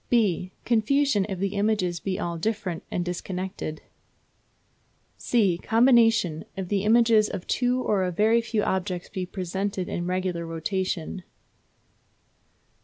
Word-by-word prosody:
(b) 190 -6 +2
Confusion, 235 -2 +2
if 190 - -3
the 195 +2 -2
images 200 -4 0
be 190 0 -3
all 170 -3 -2
different 190 -2 -2
and 175 - -2
disconnected. 180 -2 -5 1.3
(c) 200 -8 +1
Combination, 225 -8 +3
if 190 -2 -4
the 200 -2 0
images 225 -1 +5
of 175 - -5
two 250 0 +1
or 205 -3 +1
a 180 - -1
very 220 +6 +3
few 230 -2 -1
objects 185 -1 -2
be 185 -1 -4
presented 190 +1 -3
in 175 0 -3
regular 185 -2 -1
rotation. 175 +2 -3
190 Hz, 125 wpm, -26 LUFS, 180-220 Hz, 1.3 s, images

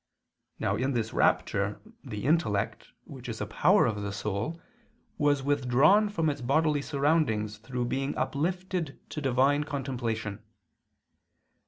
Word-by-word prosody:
Now - - 0
in 135 +2 0
this 115 -2 -2
rapture - - +1 0.2
the 105 -1 -6
intellect, 125 -10 0 0.2
which - - -10
is - - -5
a - - -2
power - - +4
of 105 -2 -1
the 100 0 -3
soul, 105 - -3 0.6
was 145 -2 +2
withdrawn 145 - +4
from 165 -6 0
its 145 -3 -1
bodily 145 +3 +2
surroundings 140 -9 0
through 125 +2 -3
being 135 +3 -2
uplifted 175 0 -2
to 150 - -4
divine 135 +2 +3
contemplation. 120 -7 -3
135 Hz, 130 wpm, -28 LUFS, 110-150 Hz, 0.6 s, power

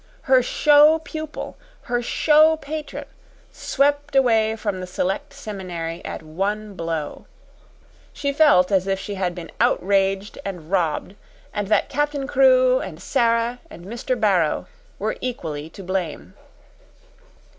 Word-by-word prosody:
Her 260 -1 +5
show 295 +4 +5
pupil, 315 -1 -7 0.3
her 245 0 -1
show 310 +5 +4
patron, 310 0 -6 0.5
swept 285 +1 0
away 225 -4 +3
from 205 -4 -3
the 185 - -6
Select 190 +10 -2
Seminary 185 -10 -6
at - - -6
one 200 +6 -3
blow. 165 -4 -4 0.8
She 280 -1 -2
felt 280 -12 +5
as 190 -1 +2
if 195 0 0
she 205 - -5
had 185 -3 -2
been 170 -2 -8
outraged 195 +1 +1
and 180 -4 -7
robbed, 175 -1 0 0.4
and 205 -2 -2
that 215 - +2
Captain 290 -1 -1
Crewe 255 -1 +4
and 165 -4 -7
Sara 230 +4 +1
and 175 - -12
Mr. 240 +4 -3
Barrow 185 -8 +2 0.3
were - - -2
equally 160 -11 -4
to 195 +4 -11
blame. 180 - -4
210 Hz, 130 wpm, -22 LUFS, 185-270 Hz, 0.8 s, Her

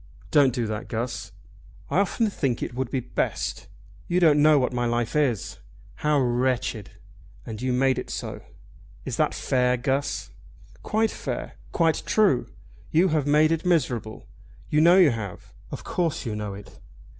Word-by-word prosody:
"Don't 140 -3 +5
do 120 -1 -2
that, 110 0 -4
Guss?" 120 -1 -4 0.6
"I 165 - +3
often 210 +3 +1
think 130 -10 -1
it - - -5
will 130 +2 -1
be 130 +2 -2
best. - - -3 0.4
You 175 +1 +2
don't 155 -4 +5
know 155 0 +6
what 130 -2 +1
my 120 -1 0
life 120 +1 -1
is, 135 -9 0 0.4
how 150 -1 +2
wretched. 125 -3 0 0.6
And 110 -1 -7
you 130 0 0
made 130 +1 +2
it - - -7
so." - - -5 0.6
"Is - - -4
that - - +1
fair, 125 -1 +1
Guss?" 135 +3 -2 0.5
"Quite 220 +1 0
fair! - - -5 0.2
Quite 165 -2 +2
true! 205 - +3 0.4
You 175 +4 +3
have 150 -3 0
made 155 +2 +4
it 165 -1 0
miserable. 125 - -1 0.5
You 150 - +4
know 170 +3 +7
you 175 -7 +6
have. 105 -5 -7 0.2
Of - - -7
course 165 -5 -2
you 110 -3 -3
know 105 -2 -4
it." 100 0 -13
130 Hz, 165 wpm, -25 LUFS, 120-155 Hz, 0.6 s, know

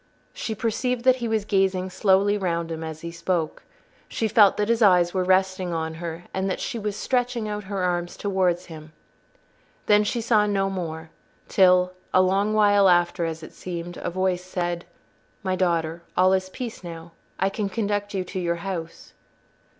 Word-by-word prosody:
She 220 - -4
perceived 235 +3 -1
that 255 0 +5
he 240 -2 -3
was 220 -2 0
gazing 190 -2 +1
slowly 195 +1 +3
round 170 -4 -2
him 160 0 -4
as 160 -1 -6
he 170 - -6
spoke. 170 -1 -2 0.5
She 225 - -1
felt 210 -2 +5
that 210 - 0
his 230 0 +1
eyes 180 -4 +5
were 185 -1 +1
resting 185 -1 +1
on 160 -1 -2
her, 170 0 -5
and 190 +1 -1
that 185 - -2
she 235 - -3
was 210 -1 -3
stretching 245 -1 -1
out 210 -1 -4
her 195 -1 -3
arms 175 -1 -1
towards 185 -3 0
him. 155 -2 -11 0.9
Then 210 0 +5
she 235 +3 -1
saw 220 -2 +3
no 195 -1 0
more 160 -3 -5 0.4
till—a 185 -1 +3
long 195 +3 +2
while 205 -2 +5
after, 175 0 +2
as 160 0 -5
it - - -10
seemed—a 175 -1 -5
voice 185 0 -1
said, 175 -1 -3 0.6
"My 185 -1 0
daughter, 170 -2 0 0.2
all 185 +1 +5
is 185 0 0
peace 235 -1 -7
now. 165 -1 -8 0.3
I 195 - +2
can 200 0 -3
conduct 205 -1 -2
you 190 - 0
to 185 +1 -5
your 170 -1 0
house." 170 -4 -6
185 Hz, 175 wpm, -24 LUFS, 175-205 Hz, 0.9 s, that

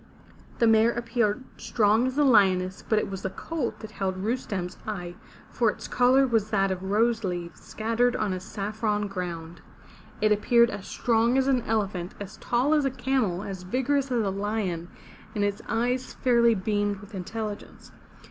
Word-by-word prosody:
The 235 - +3
mare 225 0 +5
appeared 235 -1 -1
strong 220 +2 +2
as 260 +2 -4
a 295 - +4
lioness, 190 -7 +3
but 220 - +3
it - - +1
was 195 -1 -5
the 190 - -2
colt 260 +6 -4
that 220 -1 -8
held 190 -3 -2
Rustem's 195 -4 -3
eye, 180 -5 -4 0.4
for 230 -2 +2
its - - -5
color 255 +2 +4
was 225 -4 +1
that 195 -2 +2
of 185 -1 -3
rose 225 +2 +2
leaves, 175 -3 -4
scattered 230 +3 0
on 210 -3 0
a 185 - -3
saffron 210 +2 -2
ground. 175 -3 -6 0.6
It 215 - +2
appeared 235 +3 +4
as 190 - -7
strong 235 +1 +2
as 265 - +3
an 260 -2 +3
elephant, 195 -5 -1
as 205 +1 -8
tall 250 +5 +1
as 300 -2 +3
a 270 - +2
camel, 245 -8 -1
as 195 -3 -6
vigorous 265 +8 0
as 235 -3 +2
a 195 - 0
lion, 195 -4 -2 0.5
and 205 - 0
its 205 +1 -1
eyes 245 +3 -1
fairly 235 -2 +4
beamed 205 +1 0
with 205 +3 -14
intelligence. 205 +3 -6
215 Hz, 175 wpm, -26 LUFS, 195-240 Hz, 0.6 s, mare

